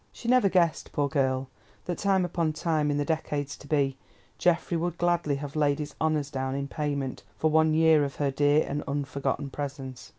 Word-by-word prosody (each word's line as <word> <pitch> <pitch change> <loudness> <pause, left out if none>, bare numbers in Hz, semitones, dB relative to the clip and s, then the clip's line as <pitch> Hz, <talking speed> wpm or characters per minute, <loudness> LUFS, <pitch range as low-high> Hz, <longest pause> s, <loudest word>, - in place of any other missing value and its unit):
She 230 - -9
never 250 -4 +5
guessed, 170 -4 +1
poor 145 -1 +1
girl, 130 -1 0 0.4
that 175 - -3
time 195 -2 +2
upon 165 -2 -1
time, 155 -1 0
in 145 - 0
the 145 - 0
decades 150 -3 -2
to 145 - -14
be, 140 -3 +1 0.4
Geoffrey 170 0 +2
would 170 +1 -1
gladly 175 -4 +1
have 145 +1 -6
laid 145 -2 +2
his 150 -1 -5
honours 155 -3 0
down 130 -1 -2
in 140 0 -2
payment 140 -3 -3 0.2
for 155 - +1
one 160 0 +4
year 160 -2 +5
of 140 -2 -3
her 140 -2 0
dear 145 +2 +3
and 145 +1 -2
unforgotten 140 -1 -2
presence. 135 -3 -6
150 Hz, 195 wpm, -27 LUFS, 140-160 Hz, 0.4 s, never